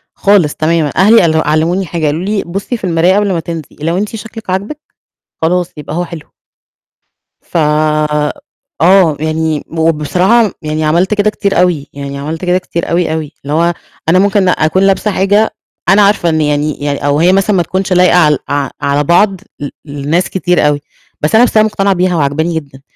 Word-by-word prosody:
خالص 195 -7 +2
تمامًا. 155 -2 0
أهلي 210 +6 +6
قال 160 -2 +2
علموني 165 +5 +1
حاجة، 165 0 -3
قالوا 150 +4 -1
لي: 205 +1 -1
"بُصّي 195 +7 -4
في - - -20
المراية 175 +1 +2
قبل 205 -1 +1
ما 170 - -1
تنزلي، 165 -2 -7
لو 165 +3 -1
أنتِ 210 +3 -3
شكلِك 225 -2 -9
عاجبِك 200 +11 -3 0.6
خلاص 180 +2 0
يبقى 150 +2 -6
هو 175 - -1
حلو." 165 -3 -10 1.1
ف - - -5 1.2
آه 175 -3 +4
يعني 155 0 -1
وبصراحة 170 +7 +1
يعني 155 0 -3
عملت 175 +6 +1
كده 210 0 +2
كتير 200 -3 -1
أوي، 165 -6 0
يعني 140 0 -6
عملت 155 +5 -5
كده 180 0 +2
كتير 175 -2 -4
أوي، 170 -2 0
أوي. 155 -2 -4
اللي 145 +2 -4
هو 170 +2 +2 0.4
أنا 185 +3 +4
ممكن 195 -1 +2
أكون 160 +3 +1
لابسة 195 +2 +1
حاجة 205 +3 +1 0.3
أنا 195 +3 +5
عارفة 200 -4 +3
إن 160 -1 +1
يعني 150 0 -1
يعني 145 0 -2
أو 145 +1 +1
هي 180 +3 +4
مثلًا 195 +1 +2
ما 175 - +2
تكونش 185 +2 -2
لايقة 180 0 +4
عل 150 -4 +3
ع 145 -2 -1
على 140 +1 +1
بعض 185 +4 +2 0.2
ل 145 -1 -4 0.2
لناس 145 +4 -2
كتير 180 -4 +1
أوي، 145 -1 0 0.4
بس 150 +7 +1
أنا 225 - +6
بس 230 - -1
أنا 215 - +5
مقتنعة 200 -2 0
بيها 180 0 0
وعاجباني 160 +2 0
جدًا، 140 -4 -7
170 Hz, 185 wpm, -13 LUFS, 155-195 Hz, 1.2 s, أهلي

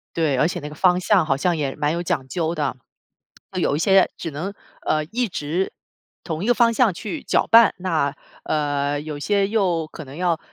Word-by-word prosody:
对， 155 -5 +1
而 150 - +3
且 175 0 -3
那 150 - -7
个 150 - -10
方 180 +2 +3
向 185 -2 +3
好 135 - +1
像 170 +5 0
也 140 -3 -2
蛮 150 0 0
有 170 +2 -2
讲 160 -7 -2
究 165 +2 -1
的， 145 -5 -2 0.8
有 - - +1
一 - - -1
些 195 +2 +4
只 165 - -5
能， 165 +7 -5 0.3
呃， 155 0 +1
一 235 +8 -1
直 175 0 -2 0.5
同 160 +1 -4
一 - - -2
个 245 - +5
方 235 -1 +4
向 225 -4 +3
去 220 - -6
搅 - - +1
拌， 230 -1 +7
那， 155 -6 0 0.3
呃， 145 -1 -1
有 150 -1 -6
些 200 +6 +1
又 185 -7 0
可 155 - -9
能 135 +2 -11
要， 175 -2 0
165 Hz, 220 characters per minute, -22 LUFS, 150-190 Hz, 0.8 s, 拌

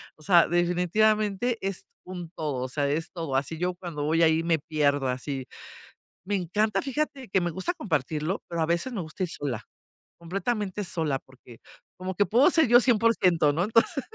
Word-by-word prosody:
o 155 - -22
sea, 170 +1 +5
definitivamente 205 +6 +1
es 195 - -4 0.2
un 180 -2 -7
todo, 150 -6 -4
o 130 - -4
sea, 140 +2 -1
es 160 +3 -2
todo. 165 -6 -4
Así, 140 +4 -1
yo 180 +2 -1
cuando 170 -5 -6
voy 165 +2 +2
ahí 160 0 +4
me 165 -1 +2
pierdo 145 -3 0
así. 130 +1 -4 0.8
Me 200 +2 -2
encanta, 205 +4 0
fíjate 275 -1 -3
que 190 0 +2
me 175 - -1
gusta 190 - -2
compartirlo, 160 - -2
pero 170 -1 -3
a - - +3
veces 170 +10 0
me 210 - -3
gusta 155 +3 -5
ir 180 - -2
sola, 130 -8 -4 0.6
completamente 200 +3 -3
sola 160 -6 0
porque 130 -3 -17 0.4
como 185 +1 -4
que 205 - +3
puedo 250 - +5
ser 320 -6 +4
yo 240 +1 +7
100%, 210 - +3
¿no? 170 +4 0
Entonces, 230 +5 +2
175 Hz, 180 wpm, -26 LUFS, 155-210 Hz, 0.8 s, yo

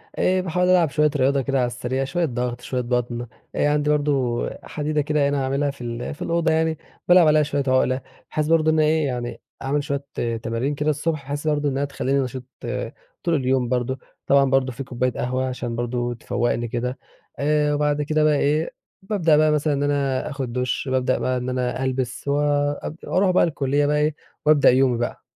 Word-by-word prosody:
آآ، 185 0 +2
باحاول 180 0 0
ألعب 175 -4 +4
شويّة 150 +1 +2
رياضة 135 0 +2
كده 135 +1 -1
على 125 - +2
السريع، 125 +2 -2
شويّة 175 +5 0
ضغط، 125 -2 -3
شويّة 125 0 -2
بطن. 120 0 -2 0.3
آآ 145 - +2
عندي 150 0 +1
برضو 140 -5 +1 0.2
حديدة 150 0 -1
كده 145 -1 +1
هِنا 140 -1 0
عاملها 140 +1 0
في 135 -3 -11
ال 120 +3 -4
في - - -19
الأوضة 165 -1 +1
يعني 160 -1 +1 0.3
بالعب 175 -2 +7
عليها 155 0 +5
شويّة 145 -1 -1
عُقلة، 130 0 +2 0.3
بحيث 155 0 0
برضو 160 -1 +3
إنّه 155 0 +3
إيه 155 0 +2
يعني 120 -2 -4 0.2
أعمل 140 +2 0
شويّة 140 0 -2 0.4
تمارين 115 +6 -1
كده 150 +2 0
الصبح 155 0 -1
بحيث 145 +2 -4
برضو 150 -1 +1
إنّها 140 +1 -1
تخلّيني 140 0 -1
نشيط 130 -1 -3 0.8
طول 170 -3 +2
اليوم 130 -2 +1
برضو. 125 +1 -1 0.3
طبعًا 140 -1 +4
برضو 135 -1 +2
في 135 +3 -6
كوباية 125 0 -1
قهوة 130 +2 -2
عشان 125 -2 -4
برضو 120 0 -2
تفوّقني 120 0 -1
كده. 125 +3 -3 0.4
آآ، 150 0 +2
وبعد 150 0 +1
كده 155 +1 +1
بقى 150 -1 +4
إيه، 150 +4 +1 0.3
بابدأ 175 -7 +2
بقى 155 0 +4
مثلًا 150 0 +1
إن 140 +1 0
أنا 140 -1 0
آخد 135 -5 -4
دُش، 125 +2 -1
بابدأ 130 0 +1
بقى 130 0 0
إن 125 +1 -3
أنا 125 +1 -1
ألبس، 130 0 -2
وأب 145 +1 0
أروح 185 0 +2
بقى 180 - +4
الكُلّية 145 -2 +1
بقى 150 +1 +2
إيه 150 0 +1 0.3
وأبدأ 150 -2 +6
يومي 130 -1 +3
بقى. 120 +1 -3
140 Hz, 190 wpm, -23 LUFS, 125-150 Hz, 0.8 s, بالعب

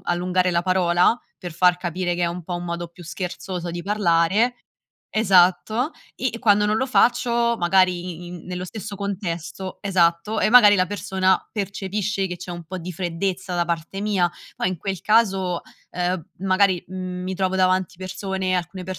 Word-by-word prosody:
allungare 180 +1 +1
la 170 0 +1
parola, 180 +4 +3 0.2
per 175 -3 -7
far 180 +1 +4
capire 175 0 -2
che 175 - -2
è - - +3
un 175 +1 -4
po' 175 +2 -5
un 175 - -6
modo 170 0 -4
più 170 +1 -14
scherzoso 180 +1 -5
di 175 0 -5
parlare 200 +3 +2 0.6
esatto, 215 - +3 0.3
e 260 - -1
e 230 - -6
quando 210 -2 +4
non 210 +1 +2
lo 260 - 0
faccio, 235 -2 +2
magari 180 -1 +1
i - - -9
in 175 -1 -9
nello 180 0 -4
stesso 205 +1 -7
contesto 190 -2 -4
esatto 185 +2 +1
e - - +3
magari 215 -3 +8
la 185 -1 +2
persona 190 0 +1
percepisce 200 -1 -2
che 180 -1 -5
c'è 180 +1 -8
un 175 -1 -7
po' 185 +3 -6
di 180 +1 -6
freddezza 180 +2 -3
da 175 -1 0
parte 170 +3 -3
mia, 195 -4 +1 0.3
poi 180 - 0
in 185 - -4
quel 190 0 -4
caso, 195 -5 +2 0.3
ehm, 180 0 -2
magari, 190 -1 +2
mhmm, 185 0 -5
mi 190 0 -3
trovo 190 0 0
davanti 185 -1 +1
persone, 190 0 -3
alcune 180 +1 -3
185 Hz, 175 wpm, -23 LUFS, 175-200 Hz, 0.6 s, magari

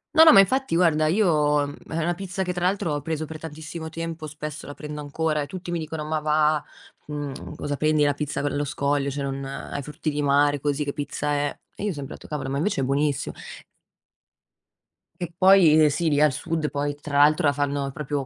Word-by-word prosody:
No, 320 - +9
no, 320 - +9
ma, - - +8
infatti, 260 +1 +3
guarda, 155 -3 +3
io 155 -6 +3 0.3
è 160 - -3
una 170 +2 +1
pizza 190 +1 -4
che, 180 0 -2
tra 175 0 -3
l'altro, 180 -4 +1
ho 145 - -2
preso 160 +1 -3
per 155 +1 -8
tantissimo 160 +1 -7
tempo, 165 -1 -5
spesso, 150 0 -7
la 145 - -7
prendo 150 0 -7
ancora 150 +1 -1
e 145 - -2
tutti 180 +1 -7
mi 170 - -1
dicono: 155 -1 -5
“Ma 155 0 -1
va’, 150 0 +2 0.4
mhmm, 145 -2 -6
cosa 145 0 -3
prendi? 155 0 +2
La 145 - +3
pizza 150 0 -3
c - - -3
allo 145 0 0
scoglio, 140 -1 0
cioè, 140 +1 -4
non 135 0 -4
ai 135 +1 -5
frutti 150 +3 -4
di 150 0 -2
mare 145 0 +3
così 145 0 0
che 140 - -3
pizza 145 0 -3
è?” 145 0 -1 0.2
E - - -7
io 210 - 0
ho 190 - -2
sempre 140 -2 -7
etto: - - -14
“Cavolo, 135 -3 -3
ma, 135 - -2
invece, 150 +2 0
è - - +1
buonissi" 140 +1 0 1.9
e 175 -1 -4
poi 185 -5 +6
eh 150 - +6
sì, 160 +3 0
lì, 145 - +2
al 150 -2 +4
sud, 160 +2 -2
poi, 145 0 -2
tra 145 -1 -3
l'altro, 150 +1 +5
la 145 - +3
fanno 140 -1 -1
proprio 145 -2 -3
150 Hz, 225 wpm, -24 LUFS, 145-160 Hz, 1.9 s, No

